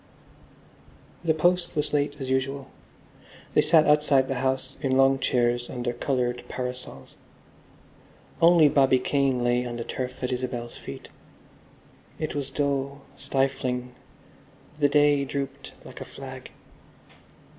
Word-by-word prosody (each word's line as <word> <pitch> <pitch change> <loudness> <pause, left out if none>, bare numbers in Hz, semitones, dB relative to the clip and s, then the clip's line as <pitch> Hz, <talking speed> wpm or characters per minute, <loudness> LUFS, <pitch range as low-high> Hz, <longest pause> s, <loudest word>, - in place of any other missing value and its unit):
The 160 -2 +2
post 175 +2 +1
was 150 0 -1
late 145 0 +1
as 135 - -4
usual. 135 +1 -2 0.8
They - - +5
sat 155 -1 +5
outside 150 -3 +4
the 135 -2 -2
house 130 0 -1
in 130 -3 +1
long 135 0 +4
chairs 120 -2 +1
under 120 -1 -3
coloured 125 -1 -1
parasols. 125 0 -6 1.2
Only 165 -2 +7
Bobby 135 -2 +4
Kane 130 -1 +1
lay 120 0 +2
on 120 -1 -5
the 120 - -4
turf 130 +2 -5
at 125 - -1
Isabel's 125 -2 -4
feet. - - -9 1.1
It 155 - -3
was 140 -2 -3
dull, 140 0 -2
stifling; 125 -2 -1 0.9
the 145 -1 +4
day 145 -1 +4
drooped 140 0 -5
like - - -10
a - - -5
flag. - - -9
135 Hz, 125 wpm, -26 LUFS, 125-145 Hz, 1.2 s, Only